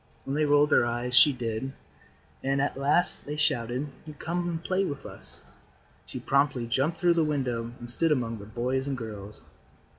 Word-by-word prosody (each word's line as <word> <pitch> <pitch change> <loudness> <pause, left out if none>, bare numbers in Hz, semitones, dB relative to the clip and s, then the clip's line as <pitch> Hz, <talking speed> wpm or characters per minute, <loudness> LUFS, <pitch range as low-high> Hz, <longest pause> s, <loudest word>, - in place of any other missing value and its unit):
When 135 - -3
they 155 0 +2
rolled 145 0 +4
their - - +5
eyes 120 +1 -2
she 145 +4 +7
did, 125 +1 -4 0.7
and 135 +1 0
at 140 - 0
last 140 +5 +2
they 150 - -3
shouted: 125 0 0 0.3
"Come 175 +1 -2
and 165 -1 -4
play 190 +2 0
with 140 -7 -5
us." - - -12 0.6
She - - -6
promptly 140 -3 +1
jumped 135 +8 0
through 175 -1 +4
the 165 -1 +2
window 125 -6 -2
and 120 - -8
stood 155 +7 +3
among 115 -6 -1
the 100 - -10
boys 125 +4 -2
and 135 -2 -2
girls. 105 -3 -8
135 Hz, 180 wpm, -27 LUFS, 120-150 Hz, 0.7 s, she